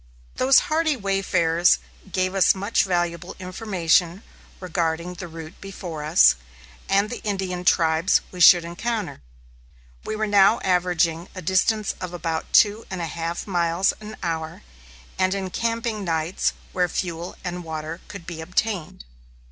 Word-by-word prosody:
Those 265 Hz, +1 st, +5 dB
hardy 315 Hz, -1 st, +1 dB
wayfarers 185 Hz, -4 st, +2 dB, 0.3 s
gave 185 Hz, 0 st, 0 dB
us 195 Hz, 0 st, +4 dB
much 200 Hz, +4 st, +1 dB
valuable 175 Hz, -1 st, -2 dB
information 180 Hz, -1 st, 0 dB, 0.4 s
regarding 170 Hz, -1 st, -2 dB
the 175 Hz, 0 st, -8 dB
route 160 Hz, 0 st, -10 dB
before 180 Hz, -5 st, -7 dB
us, 155 Hz, +4 st, +6 dB, 0.6 s
and 200 Hz, +3 st, +2 dB
the 245 Hz, -, -6 dB
Indian 190 Hz, -3 st, -3 dB
tribes 165 Hz, +1 st, +3 dB
we 180 Hz, -, -9 dB
should 175 Hz, -1 st, +8 dB
encounter. 210 Hz, -, -4 dB, 0.8 s
We -, -, -4 dB
were 215 Hz, 0 st, -1 dB
now 205 Hz, +1 st, +5 dB
averaging 175 Hz, -2 st, +1 dB
a 185 Hz, -, -6 dB
distance 195 Hz, +4 st, +1 dB
of 180 Hz, -1 st, -5 dB
about 165 Hz, -1 st, -3 dB
two 210 Hz, +1 st, +4 dB
and 190 Hz, -, -5 dB
a 170 Hz, -, -2 dB
half 165 Hz, +1 st, -4 dB
miles 175 Hz, -1 st, +1 dB
an 215 Hz, 0 st, -9 dB
hour, 160 Hz, -2 st, -4 dB, 0.6 s
and 185 Hz, +1 st, +2 dB
encamping 225 Hz, +3 st, -2 dB
nights 165 Hz, 0 st, -1 dB, 0.2 s
where 180 Hz, -1 st, +1 dB
fuel 170 Hz, 0 st, -4 dB
and 180 Hz, -1 st, -4 dB
water 160 Hz, +1 st, -6 dB
could 200 Hz, -5 st, -9 dB
be 165 Hz, -2 st, -7 dB
obtained. 180 Hz, -, -2 dB
180 Hz, 140 wpm, -23 LUFS, 165-195 Hz, 0.8 s, should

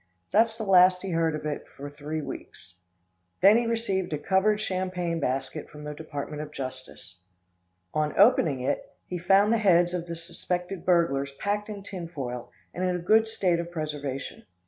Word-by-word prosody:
That's 225 Hz, +1 st, +3 dB
the 225 Hz, -, -3 dB
last 185 Hz, -2 st, +5 dB
he 195 Hz, -, -3 dB
heard 165 Hz, -1 st, +1 dB
of 150 Hz, -, -6 dB
that 150 Hz, -1 st, -4 dB
for 140 Hz, -, -9 dB
three 150 Hz, +2 st, -5 dB
weeks. 85 Hz, -, -9 dB, 0.7 s
Then 200 Hz, +3 st, +8 dB
he 235 Hz, 0 st, +2 dB
received 195 Hz, -7 st, -1 dB
a -, -, 0 dB
covered 195 Hz, +6 st, +2 dB
champagne 185 Hz, -4 st, -2 dB
basket 135 Hz, +2 st, -2 dB
from 150 Hz, 0 st, -11 dB
the 150 Hz, 0 st, -5 dB
Department 150 Hz, -1 st, -6 dB
of 150 Hz, -1 st, -7 dB
Justice. 130 Hz, -9 st, -8 dB, 0.7 s
On 150 Hz, -1 st, -1 dB
opening 165 Hz, -, +5 dB
it 130 Hz, -, -1 dB, 0.2 s
he 180 Hz, -, -4 dB
found 195 Hz, +5 st, +4 dB
the 230 Hz, -, +2 dB
heads 175 Hz, -4 st, +4 dB
of 175 Hz, -1 st, -3 dB
the 170 Hz, -, -4 dB
suspected 175 Hz, +2 st, -4 dB
burglars 140 Hz, -6 st, +2 dB
packed 205 Hz, +8 st, -2 dB
in 205 Hz, -2 st, -6 dB
tinfoil 140 Hz, -11 st, -6 dB, 0.2 s
and 180 Hz, -, -3 dB
in 180 Hz, -1 st, +1 dB
a 175 Hz, -1 st, -5 dB
good 220 Hz, +3 st, +5 dB
state 185 Hz, -6 st, +1 dB
of 170 Hz, 0 st, -4 dB
preservation. 145 Hz, -5 st, -5 dB
170 Hz, 175 wpm, -27 LUFS, 150-190 Hz, 0.7 s, Then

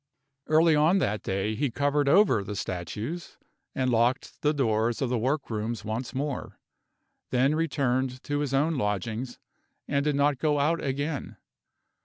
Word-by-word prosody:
Early 160 Hz, +1 st, +5 dB
on 155 Hz, +6 st, +4 dB
that 105 Hz, -, 0 dB
day 95 Hz, +3 st, -1 dB
he 140 Hz, +5 st, 0 dB
covered 145 Hz, +3 st, +1 dB
over 140 Hz, -, +5 dB
the 105 Hz, +1 st, -5 dB
statues, 105 Hz, -, -5 dB, 0.4 s
and 130 Hz, -1 st, +1 dB
locked 120 Hz, +3 st, 0 dB
the 150 Hz, -, +3 dB
doors 115 Hz, -5 st, +1 dB
of 130 Hz, -, 0 dB
the 125 Hz, -, +1 dB
work 135 Hz, +3 st, -1 dB
rooms 110 Hz, +1 st, -3 dB
once 115 Hz, +5 st, -4 dB
more; 140 Hz, 0 st, -3 dB, 0.7 s
then 130 Hz, +3 st, +2 dB
returned 130 Hz, -5 st, 0 dB
to 145 Hz, 0 st, -2 dB
his 145 Hz, -2 st, -2 dB
own 150 Hz, +3 st, +1 dB
lodgings, 110 Hz, +4 st, -2 dB, 0.5 s
and 140 Hz, 0 st, +1 dB
did 150 Hz, -1 st, +1 dB
not 140 Hz, -1 st, +2 dB
go 150 Hz, -1 st, +1 dB
out 160 Hz, +4 st, +1 dB
again. 145 Hz, +2 st, -3 dB
135 Hz, 155 wpm, -27 LUFS, 115-150 Hz, 0.7 s, Early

